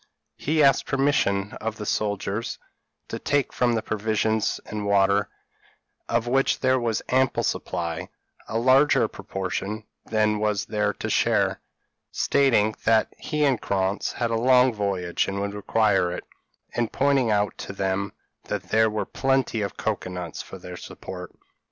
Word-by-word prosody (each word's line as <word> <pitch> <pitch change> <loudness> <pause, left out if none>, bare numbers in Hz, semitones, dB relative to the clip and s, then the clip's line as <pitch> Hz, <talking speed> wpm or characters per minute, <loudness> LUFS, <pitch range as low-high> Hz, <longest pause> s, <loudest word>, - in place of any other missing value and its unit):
He 155 +1 +2
asked 135 -1 +4
permission 110 -8 +1
of 110 0 -3
the 105 - -5
soldiers 105 +1 -2 0.5
to - - -5
take 145 -1 0
from 120 -1 +2
the 110 - -1
provisions 110 0 0
and 105 -1 -4
water, 100 0 +3 0.8
of 115 - +1
which 135 +3 +2
there 130 0 +3
was 115 -3 -1
ample 130 +1 +2
supply, 85 -2 -2 0.4
a 115 - -2
larger 130 +5 +4
proportion 95 +3 -4 0.2
than 105 -1 +1
was 105 -1 0
their 105 -1 0
share; - - +2 0.5
stating, 115 -7 +3
that 110 -1 +3
he 150 -1 0
and 135 -5 +2
Krantz 95 0 -1
had 120 -1 -1
a - - +1
long 125 0 +5
voyage 95 -5 -1
and 100 0 -3
would 100 0 -2
require 105 -3 +2
it, 90 - -5 0.5
and 120 -2 -1
pointing 140 -3 +2
out 105 -1 +1
to - - -5
them 100 0 -1 0.3
that 95 -3 -4
there 110 0 +4
were 105 0 -2
plenty 135 -4 0
of 100 -2 -4
cocoa - - -2
nuts 90 -2 -5
for - - -10
their 90 0 -9
support. 90 0 -9
110 Hz, 150 wpm, -25 LUFS, 100-125 Hz, 0.8 s, long